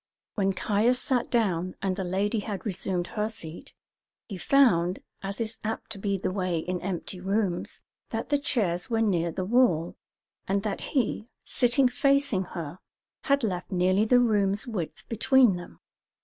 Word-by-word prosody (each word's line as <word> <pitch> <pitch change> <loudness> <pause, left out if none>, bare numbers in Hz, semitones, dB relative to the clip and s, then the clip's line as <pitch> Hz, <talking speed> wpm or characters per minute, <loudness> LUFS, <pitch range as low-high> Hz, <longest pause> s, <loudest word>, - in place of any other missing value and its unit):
When 195 -2 +1
Caius 215 +6 +2
sat 255 -3 0
down, 185 -7 0
and 195 -1 -1
the 190 - -3
lady 200 +5 0
had 205 0 -5
resumed 185 -3 -2
her 210 0 0
seat, 170 -7 -8 0.5
he 205 - -6
found, 185 -5 +3 0.2
as 195 0 -4
is 225 -1 -2
apt 220 +1 -4
to 210 - -4
be 200 0 0
the 185 - -2
way 185 -3 -1
in 180 +2 -3
empty 185 0 -4
rooms, 195 -1 -1 0.3
that - - -4
the 290 -1 +2
chairs 180 -11 0
were 225 -1 +1
near 170 -5 +1
the 185 +3 -3
wall, 195 -7 +2 0.5
and 195 +1 0
that 210 -2 -2
he, 240 -5 -1 0.2
sitting 250 +1 +3
facing 260 -5 +2
her, 165 +2 -5 0.5
had 280 -2 +2
left 185 -5 -2
nearly 185 +3 +3
the 245 +2 +5
room's 205 -3 +2
width 205 -10 -5
between 235 -1 +4
them. 175 0 -9
200 Hz, 165 wpm, -27 LUFS, 180-230 Hz, 0.5 s, the